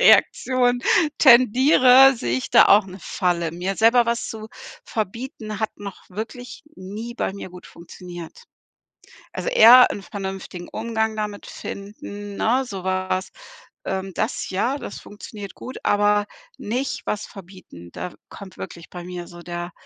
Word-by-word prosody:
Reaktion 255 - +4 0.4
tendiere, 260 +1 +7
sehe 120 - -1
ich - - -6
da - - +7
auch 205 0 +5
'ne 190 +1 -10
Falle. 170 -2 -1
Mir 180 +4 -3
selber 230 +3 +4
was 235 0 -1
zu 220 -1 -7 0.4
verbieten, 220 0 -5
hat 220 0 -1
noch 200 -2 -8
wirklich 225 +6 -8
nie 210 +6 -7
bei 215 - -2
mir 195 -1 -8
gut 180 0 -12
funktioniert. 175 - -11 0.9
Also - - -3
eher 250 - +8
'n 200 - -7
vernünftigen 190 -2 -7
Umgang 220 0 -2
damit 210 -1 -5
finden, 205 0 -8
ne? 250 +4 +2
So 195 -5 -7
was. 185 0 -2 0.5
Ähm, 190 0 -3
das 220 +8 -2
ja, 235 +9 0
das 205 - -8
funktioniert 205 -1 -10
gut, 260 - -9
aber 205 0 +2 0.3
nicht 250 +6 -3
was 210 0 -2
verbieten. 180 - -13
Da 180 - -6
kommt 195 -2 -12
wirklich 170 -1 -9
bei 175 -1 -8
mir 175 0 -7
so 175 0 -12
der 175 0 -6
205 Hz, 145 wpm, -22 LUFS, 185-235 Hz, 0.9 s, eher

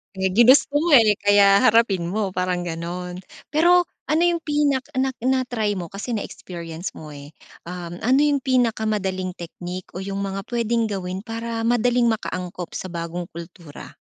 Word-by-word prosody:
Eh, 190 0 0
ginusto 245 +8 +5
mo 320 +3 +2
eh, 225 -6 +7
kaya 200 +1 +5
harapin 220 -6 +4
mo 195 +1 -2
parang 180 -1 -1
ganun. 180 +2 -5 0.2
Pero 350 +3 +4 0.2
ano 315 +2 +3
yung 340 -2 0
pinak 290 -3 +1
nak 260 -1 -1
na-try 250 -5 0
mo 175 - -5
kasi 200 +7 -6
na-experience 170 -5 -6
mo, 150 -2 -11
eh. 145 +1 -11 0.3
Um, 175 0 -7
ano 260 +4 +4
yung 290 -2 +2
pinakamadaling 215 -7 0
technique 175 +1 -7
o 190 - -4
yung 195 0 -4
mga 195 0 -3
pwedeng 235 -1 +1
gawin 190 0 -4
para 230 0 -4
madaling 240 0 +2
maka-angkop 180 -4 -5
sa 185 - -5
bagong 170 +1 -4
kultura? 170 -2 -11
200 Hz, 155 wpm, -22 LUFS, 180-245 Hz, 0.3 s, eh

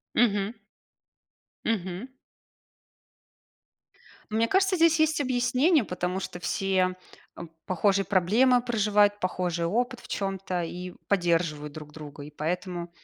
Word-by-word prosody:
Мгм. 205 -3 +2 1.1
Мгм. 190 0 -2 2.2
Мне 225 +2 +2
кажется, 385 +5 +3
здесь 330 -2 +4
есть 315 -1 +3
объяснение, 255 - +2
потому 180 0 -2
что 180 - -6
все, 185 0 0 0.4
э, - - -7 0.2
похожие 195 +2 +2
проблемы 220 +8 +3
проживают, 210 -3 +2
похожий 180 -2 -1
опыт 245 +7 -1
в - - -14
чём-то 195 -2 -2
и 180 +2 -6
поддерживают 170 -6 +1
друг 150 -1 -10
друга, 145 -2 -9
и 150 - -10
поэтому 175 +3 -3
195 Hz, 110 wpm, -27 LUFS, 175-240 Hz, 2.2 s, здесь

